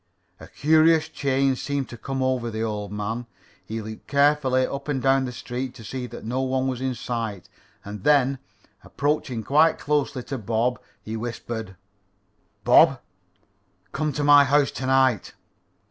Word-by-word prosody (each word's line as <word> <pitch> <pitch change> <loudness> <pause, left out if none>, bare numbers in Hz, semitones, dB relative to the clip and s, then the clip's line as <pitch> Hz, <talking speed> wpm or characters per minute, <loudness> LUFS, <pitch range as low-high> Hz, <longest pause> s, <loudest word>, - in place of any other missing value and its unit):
A - - -11
curious 160 +1 +3
change 135 -3 0
seemed 140 -2 -2
to - - -8
come 135 +3 -3
over 130 -2 0
the 110 0 -3
old 105 -2 -4
man. 110 +3 -4 0.4
He 110 0 -5
looked 110 0 -9
carefully 140 -2 +3
up 140 +2 -6
and 145 -3 -1
down 135 0 +2
the 125 - -4
street 125 +1 -5
to 115 - -11
see 125 +3 -5
that - - -10
no 125 +4 -1
one 130 0 0
was 130 -1 -3
in 130 -1 -1
sight, 115 -6 -4 0.4
and 100 -1 -8
then, 140 -2 +3 0.4
approaching 140 -5 -2
quite 155 +7 +4
closely 145 -3 -1
to 135 0 -5
Bob, 115 +3 0 0.2
he 110 +1 -5
whispered: 110 -3 -5 0.9
"Bob, - - +6 0.9
come 155 -1 -1
to 145 - -2
my 145 0 +7
house 140 +1 +2
to 130 - -5
night." 130 -5 +2
130 Hz, 160 wpm, -24 LUFS, 115-140 Hz, 0.9 s, my